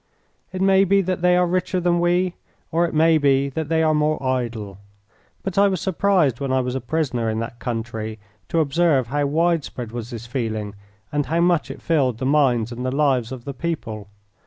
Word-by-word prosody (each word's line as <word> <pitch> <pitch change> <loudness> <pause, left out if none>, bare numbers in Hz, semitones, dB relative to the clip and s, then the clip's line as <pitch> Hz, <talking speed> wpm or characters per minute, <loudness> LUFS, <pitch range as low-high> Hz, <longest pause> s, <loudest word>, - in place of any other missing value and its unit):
It 185 0 -2
may 195 0 +5
be 195 +1 +3
that 185 -1 -2
they 180 0 +4
are 180 - +4
richer 180 +1 0
than 175 -1 +1
we, 175 +1 +1 0.4
or 170 +2 +2
it - - -7
may 160 +1 +4
be 140 -1 +2
that 155 +2 -4
they 160 0 +2
are 155 -1 +3
more 150 0 +1
idle: 115 -6 -2 0.6
but 195 0 -1
I 200 - +6
was 190 -3 -1
surprised 185 - +1
when 135 -2 -2
I 130 - +2
was 125 -1 -2
a 130 - -3
prisoner 125 -3 -1
in 110 - -2
that 115 +1 -6
country 115 -2 -4 0.3
to 165 - +2
observe 145 -4 +2
how 145 +1 0
widespread 155 -6 -1
was 120 -1 -6
this 115 -2 -7
feeling, 110 -4 -3 0.4
and 145 -1 -1
how 165 +2 +1
much 175 -2 +2
it - - -9
filled 135 -8 +1
the 130 - -3
minds 130 -5 +2
and 120 +1 -5
the 130 - 0
lives 130 -4 +1
of 130 -2 -8
the 140 - -4
people. 120 -9 -4
145 Hz, 205 wpm, -22 LUFS, 120-170 Hz, 0.6 s, I